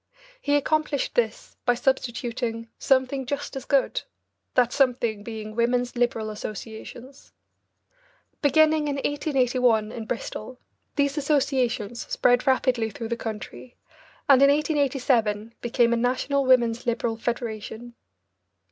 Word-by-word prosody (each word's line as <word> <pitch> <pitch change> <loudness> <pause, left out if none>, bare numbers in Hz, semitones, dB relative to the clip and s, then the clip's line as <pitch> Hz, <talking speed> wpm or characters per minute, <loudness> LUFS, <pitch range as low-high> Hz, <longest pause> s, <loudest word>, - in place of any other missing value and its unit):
He 290 0 +1
accomplished 300 -1 0
this 225 -3 -1
by 245 - +3
substituting 235 -2 -2
"something 265 0 +2
just 285 +1 -4
as 265 0 -6
good," 275 -2 +1 0.5
that 245 -2 +3
something 240 -6 +1
being 215 0 -7
Women's 245 +1 +1
Liberal 230 -3 0
Associations. 220 +5 -9 1.1
Beginning 310 +1 +4
in 285 - -1
1881 255 -6 +1
in 225 -2 -6
Bristol, 245 +1 -5 0.4
these 285 0 +1
associations 255 -6 0
spread 245 +2 +3
rapidly 250 -3 +2
through 225 +1 -6
the 235 - 0
country 225 +2 -7 0.5
and, 275 -2 +6
in 275 - +7
1887, 260 -7 +1
became 235 0 +2
a - - +2
National 260 +3 0
Women's 240 -2 +3
Liberal 230 -1 0
Federation. 230 0 -4
245 Hz, 115 wpm, -25 LUFS, 230-275 Hz, 1.1 s, in